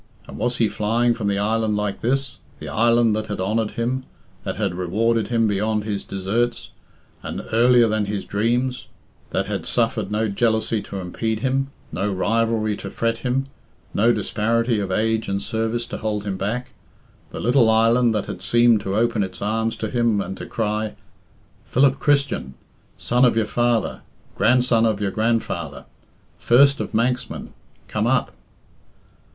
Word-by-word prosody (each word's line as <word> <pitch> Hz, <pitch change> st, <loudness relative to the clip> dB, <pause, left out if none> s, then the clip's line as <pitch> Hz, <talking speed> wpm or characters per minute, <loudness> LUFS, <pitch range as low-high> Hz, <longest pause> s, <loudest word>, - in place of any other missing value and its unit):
And -, -, -9 dB
was 125 Hz, 0 st, 0 dB
he 115 Hz, -, +3 dB
flying 115 Hz, +4 st, +1 dB
from 115 Hz, -3 st, -3 dB
the 100 Hz, -1 st, +1 dB
island 110 Hz, +1 st, 0 dB
like 105 Hz, -1 st, -2 dB
this? 135 Hz, +2 st, 0 dB, 0.2 s
The -, -, -8 dB
island 115 Hz, -1 st, +3 dB
that 110 Hz, 0 st, -3 dB
had 105 Hz, -, -4 dB
honoured 105 Hz, +3 st, 0 dB
him, 125 Hz, +3 st, -1 dB, 0.4 s
that -, -, -3 dB
had 100 Hz, -3 st, -1 dB
rewarded 110 Hz, +6 st, 0 dB
him 115 Hz, -2 st, +2 dB
beyond 105 Hz, +1 st, 0 dB
his 105 Hz, -2 st, -3 dB
deserts, 110 Hz, +5 st, -2 dB, 0.5 s
and -, -, -5 dB
earlier 120 Hz, +1 st, +5 dB
than 110 Hz, -1 st, 0 dB
his 100 Hz, -1 st, -3 dB
dreams, 120 Hz, +5 st, -1 dB, 0.4 s
that -, -, -1 dB
had -, -, -3 dB
suffered 115 Hz, -4 st, 0 dB
no 110 Hz, +1 st, +1 dB
jealousy 110 Hz, +1 st, +1 dB
to 100 Hz, -, -7 dB
impede 110 Hz, +4 st, -3 dB
him, 135 Hz, +1 st, 0 dB, 0.2 s
no 100 Hz, +2 st, -1 dB
rivalry 110 Hz, +2 st, +1 dB
to 100 Hz, -, -7 dB
fret 115 Hz, +3 st, -1 dB
him, 130 Hz, +2 st, -1 dB, 0.5 s
no 115 Hz, +4 st, +4 dB
disparity 115 Hz, +2 st, 0 dB
of 100 Hz, -2 st, -3 dB
age 110 Hz, +3 st, 0 dB
and 100 Hz, 0 st, -1 dB
service 115 Hz, +1 st, -2 dB
to -, -, -6 dB
hold 105 Hz, -2 st, -2 dB
him 100 Hz, -2 st, -3 dB
back 105 Hz, +6 st, -3 dB, 0.6 s
the -, -, -7 dB
little 120 Hz, -1 st, +4 dB
island 115 Hz, +2 st, +4 dB
that 105 Hz, -, -1 dB
had -, -, -7 dB
seemed 120 Hz, -2 st, +4 dB
to 95 Hz, 0 st, -3 dB
open 115 Hz, 0 st, +1 dB
its 95 Hz, -2 st, -4 dB
arms 110 Hz, +2 st, -1 dB
to 110 Hz, 0 st, -3 dB
him, 115 Hz, -2 st, +1 dB
and 95 Hz, -, -4 dB
to -, -, -7 dB
cry, 110 Hz, -1 st, -2 dB, 0.7 s
"Philip 135 Hz, +1 st, +3 dB
Christian, 140 Hz, -, +1 dB, 0.4 s
son 125 Hz, +2 st, +1 dB
of 125 Hz, -, +5 dB
your 110 Hz, -, +2 dB
father, 120 Hz, -1 st, 0 dB, 0.3 s
grandson 115 Hz, +1 st, +3 dB
of 110 Hz, -2 st, 0 dB
your 100 Hz, -2 st, -1 dB
grandfather, 115 Hz, +2 st, -1 dB, 0.5 s
first 140 Hz, +4 st, +5 dB
of -, -, -4 dB
Manxmen, 125 Hz, +2 st, -1 dB, 0.3 s
come -, -, -1 dB
up!" -, -, +1 dB
110 Hz, 165 wpm, -22 LUFS, 105-120 Hz, 0.7 s, earlier